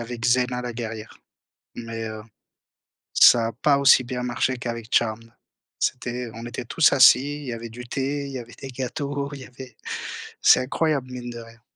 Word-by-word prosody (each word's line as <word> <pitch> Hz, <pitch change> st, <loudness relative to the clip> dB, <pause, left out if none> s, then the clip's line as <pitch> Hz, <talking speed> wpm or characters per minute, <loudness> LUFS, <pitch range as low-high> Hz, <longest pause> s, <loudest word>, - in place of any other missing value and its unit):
avait 120 Hz, 0 st, -7 dB
Xena 125 Hz, +1 st, +1 dB
la 120 Hz, -1 st, -4 dB
guerrière, 115 Hz, -2 st, -7 dB, 0.6 s
mais, 115 Hz, -1 st, -6 dB
heu, 110 Hz, 0 st, -7 dB, 0.9 s
ça 115 Hz, -2 st, +7 dB
a -, -, -3 dB
pas 140 Hz, +5 st, +2 dB
aussi 135 Hz, -2 st, +6 dB
bien 125 Hz, 0 st, -4 dB
marché 125 Hz, +1 st, -1 dB
qu'avec 115 Hz, -2 st, -5 dB
Charmed. 115 Hz, 0 st, 0 dB, 0.5 s
C'était 125 Hz, -1 st, -2 dB
on 115 Hz, +1 st, -8 dB
était 120 Hz, 0 st, -6 dB
tous 155 Hz, +5 st, +4 dB
assis, 140 Hz, +3 st, +5 dB
il -, -, -9 dB
y 120 Hz, -, -3 dB
avait 115 Hz, 0 st, -7 dB
du 120 Hz, +2 st, -9 dB
thé, 140 Hz, +2 st, -2 dB
il -, -, -7 dB
y 130 Hz, -, -5 dB
avait 115 Hz, -1 st, -11 dB
des 135 Hz, -, -8 dB
gâteaux, 140 Hz, +2 st, -4 dB
il 140 Hz, -, -8 dB
y -, -, -9 dB
avait 125 Hz, -1 st, -12 dB, 0.7 s
c'est -, -, +6 dB
incroyable, 135 Hz, -1 st, -1 dB
mine 120 Hz, -1 st, -6 dB
de 120 Hz, 0 st, -7 dB
rien. 115 Hz, 0 st, -14 dB
125 Hz, 190 wpm, -24 LUFS, 115-130 Hz, 0.9 s, ça